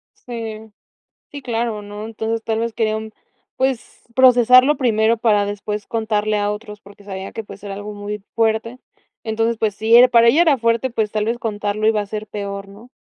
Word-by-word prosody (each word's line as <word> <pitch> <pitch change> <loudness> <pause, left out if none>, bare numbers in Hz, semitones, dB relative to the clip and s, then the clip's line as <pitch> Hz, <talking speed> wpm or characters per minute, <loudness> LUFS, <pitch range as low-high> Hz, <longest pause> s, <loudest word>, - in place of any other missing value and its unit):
Sí. 220 -2 -7 0.6
Sí, 285 - -8
claro, 230 -4 -2
¿no? 205 +1 -8
Entonces 225 0 -3
tal 220 -1 -2
vez 230 -1 -3
quería 215 -1 0
un 220 0 -7 0.4
pues 260 -2 -2
procesarlo 255 +2 +6
primero 225 -3 +2
para 210 -3 +2
después 205 +1 -4
contarle 215 -2 -1
a 205 0 0
otros 210 0 -7
porque 200 0 -17
sabía 190 -1 -7
que 225 - -6
pues 200 -1 -12
era 200 -1 -6
algo 205 +1 -7
muy 205 0 -6
fuerte. 225 +2 0 0.5
Entonces 225 +1 0
pues 215 -3 0
si 220 +3 +4
era 250 +1 +8
para 235 -1 +5
ella 300 +8 +5
era 305 -6 +3
fuerte 230 +2 +1
pues 220 -3 -1
tal 215 0 -1
vez 235 +1 -1
contarlo 210 -1 -2
iba 220 -1 +3
a - - -8
ser 215 +1 -6
peor, 200 -1 -6
¿no? 210 +5 -15
220 Hz, 195 wpm, -20 LUFS, 210-230 Hz, 0.6 s, era